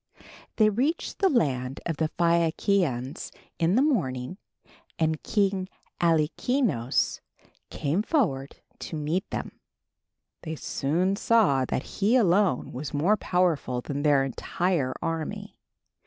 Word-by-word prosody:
They 215 -1 +4
reached 275 +10 -1
the 390 - +4
land 135 - 0
of 165 -3 -2
the 160 -1 0
Phaiakians 170 -5 +1 0.3
in 170 +3 +2
the 260 - +4
morning 170 - -1 0.6
and 160 -1 0
King 195 -3 0 0.3
Alkinoös 165 - +1 0.5
came 155 +7 -1
forward 175 - 0 0.2
to - - -6
meet 155 +6 -2
them. - - -5 0.8
They 160 -1 -5
soon 175 +7 -1
saw 195 - +3
that 130 - -2
he 210 +5 0
alone 195 - +2
was 145 +3 -5
more 175 +9 +3
powerful 175 -10 0
than 140 +2 -4
their 145 -2 +4
entire 135 +1 -1
army. 165 -2 -4
165 Hz, 115 wpm, -26 LUFS, 140-200 Hz, 0.8 s, They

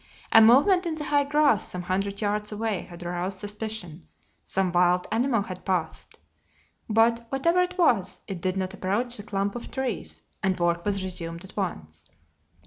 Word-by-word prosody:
A 225 - +8
movement 290 - +6
in 325 - -2
the 305 - -5
high 290 -1 +2
grass 290 -6 +3
some 180 0 -5
hundred 195 +3 -2
yards 210 0 -1
away 215 -2 -2
had 175 0 -10
aroused 175 +2 -3
suspicion; 205 - -6 0.3
some 190 -1 -1
wild 180 0 +3
animal 230 -1 +1
had 185 -2 -8
passed, 180 -5 -2 0.7
but, 230 +2 +3
whatever 335 +8 +2
it 360 +1 -2
was, 230 - +2
it 190 -4 -5
did 185 0 -1
not 190 0 -2
approach 230 +6 -1
the - - -6
clump 200 -1 -2
of 240 - -6
trees 260 -5 -4 0.2
and 190 -1 0
work 170 0 +1
was 200 -2 0
resumed 170 -2 -5
at 190 - -13
once. 80 - -5
200 Hz, 170 wpm, -26 LUFS, 180-235 Hz, 0.7 s, A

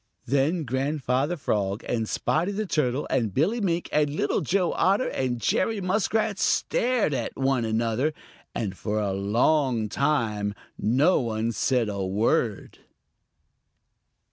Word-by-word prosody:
Then 140 +6 +1
Grandfather 135 +3 -1
Frog 100 -6 -1
and 115 -2 -1
Spotty 170 +6 0
the 215 +2 -2
Turtle 145 -6 0
and 110 -4 +1
Billy 205 - +1
Mink 175 -3 0
and 150 -1 +2
Little 145 -1 0
Joe 180 +4 +1
Otter 200 +7 +2
and 125 -2 -2
Jerry 205 - +1
Muskrat 200 +2 0
stared 245 - +1
at 120 -4 -3
one 125 -5 +1
mother, 115 +6 0 0.4
and 100 -5 -2
for 105 +2 -2
a 100 -2 -1
long 115 +4 +1
time 105 -7 0 0.2
no 135 - +3
one 115 -2 -1
said 120 +1 +1
a 100 -2 -3
word. 105 +2 0
130 Hz, 130 wpm, -26 LUFS, 110-160 Hz, 0.4 s, no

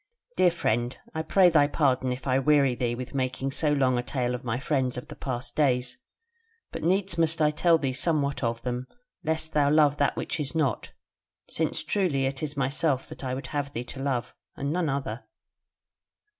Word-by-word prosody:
"Dear 180 - +5
friend, 120 -7 -1 0.2
I 160 - -2
pray 180 +2 +5
thy 145 -3 +5
pardon 130 -4 +1
if 125 0 -5
I 130 -1 +2
weary 140 -2 +4
thee 120 -1 -1
with 125 +2 -7
making 135 0 -1
so 150 +2 +1
long 130 -4 +2
a - - +1
tale 125 0 -2
of 125 - -5
my 120 -1 -1
friends 130 -3 0
of 125 - -7
the - - -8
past 125 -2 -5
days; 125 -4 +1 0.7
but - - -5
needs 185 +1 +1
must 165 0 +2
I 150 -1 +4
tell 165 +2 +4
thee 135 -4 -2
somewhat 140 0 0
of 115 0 -1
them, 125 0 -3 0.4
lest 160 0 -2
thou 145 -1 +3
love 150 -1 +4
that 145 - +1
which - - -3
is 145 -1 -2
not. 150 -5 0 0.6
Since 160 0 -1
truly 155 -7 +1
it 135 0 -3
is 150 -1 -4
myself 135 0 0
that - - -10
I 130 -1 -2
would 135 - -6
have 145 -1 -2
thee 120 - -3
to 135 - -7
love, 135 -4 -2 0.2
and 140 +2 -2
none 175 -3 0
other. 130 -5 -3
140 Hz, 200 wpm, -27 LUFS, 125-155 Hz, 0.7 s, Dear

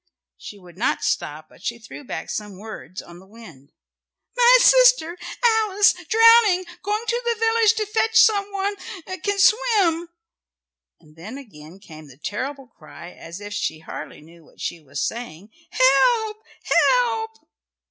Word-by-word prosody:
She 205 - -11
would 180 -1 -17
not 235 - -1
stop, 155 +1 -3
but - - -21
she 235 - -3
threw 230 +5 -12
back - - -7
some 210 -3 -6
words 190 -6 -9
on 175 0 -14
the 190 - -18
wind. 175 - -16 0.6
"My - - +6
sister - - +5 0.3
Alice 430 -3 +3 0.2
drowning. 455 -5 +5 0.2
Going 420 +3 -3
to 475 +2 -1
the 470 -1 0
village 450 -1 +3
to 435 -1 -2
fetch 445 +2 +1
some 410 -2 +3
one 400 +1 -2 0.5
can 405 -1 -1
swim." 395 -6 +2 0.9
And 155 0 -22
then 210 +11 -9
again 180 - -14
came 155 -6 -14
the 135 -2 -17
terrible 265 - -5
cry, 170 -6 -14
as 170 +1 -11
if 205 0 -8
she 160 - -3
hardly - - -9
knew 165 +2 -18
what - - -24
she 170 - -5
was 140 -1 -4
saying, 220 -4 -8 0.2
"Help, 425 - +2 0.5
help!" 460 -3 +1
280 Hz, 150 wpm, -22 LUFS, -, 0.9 s, My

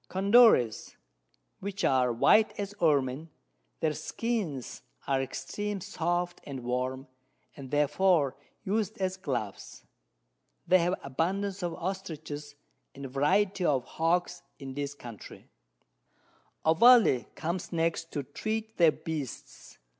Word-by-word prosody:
Condores, 195 - +4 0.6
which 200 0 -5
are 125 -2 +3
white 215 - +4
as 200 0 -3
Ermin; 145 -1 +1 0.5
their 155 -1 +1
Skins 190 - -3 0.2
are 135 -1 +1
extreme 195 +10 -4
soft 175 -2 -2
and 135 -3 -7
warm, 130 +2 -2 0.5
and 135 -2 -9
therefore 150 +1 +2 0.3
us'd 210 +1 -1
as 190 -1 -1
Gloves. 125 - -5 0.8
They 185 - +5
have 175 +2 +1
abundance 190 +8 -2
of 175 -2 -2
Ostriches, 155 -5 -6 0.4
and 140 0 -8
Variety 185 +8 +2
of 135 -7 +1
Hawks 175 +2 0 0.2
in 135 -2 -8
this 140 +1 -4
Country. 120 -7 -11 1.2
Ovalle 165 - +6
comes 170 +3 -4
next 165 0 -1
to 145 - -2
treat 220 +10 -4
of - - -39
their 165 -3 +6
Beasts. 150 -6 -7
165 Hz, 115 wpm, -29 LUFS, 135-190 Hz, 1.2 s, Ovalle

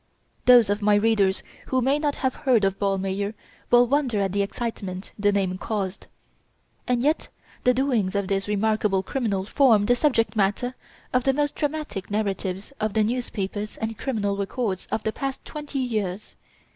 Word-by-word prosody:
Those 240 -5 +7
of 205 +1 -1
my 205 0 +4
readers 205 -3 +2 0.2
who 260 - +1
may 270 +4 +2
not 295 -1 0
have 260 -1 0
heard 250 -7 +2
of 195 0 -1
Ballmeyer 195 +1 -1 0.3
will 245 0 +6
wonder 255 -4 +1
at 195 -2 0
the 200 +1 +1
excitement 200 -2 -4
the 205 0 +3
name 190 -2 0
caused. 200 -3 -3 0.8
And 245 -1 +1
yet 305 +3 +1 0.4
the 250 - +6
doings 245 -8 +1
of 200 -1 0
this 195 0 -1
remarkable 210 -2 +1
criminal 205 -6 -1
form 220 -3 +4
the 245 - +4
subject 245 -4 +1
matter 210 +5 +1 0.4
of 255 -1 +3
the 270 - +3
most 290 0 +1
dramatic 295 -10 -3
narratives 200 +1 -2
of 215 -1 -1
the 220 -1 +3
newspapers 210 -3 -3
and 220 0 -3
criminal 210 -5 -1
records 200 -1 -2
of 220 - -1
the 220 - -1
past 270 -1 -4
twenty 295 -2 -6
years. 215 -6 -2
215 Hz, 170 wpm, -25 LUFS, 200-250 Hz, 0.8 s, Those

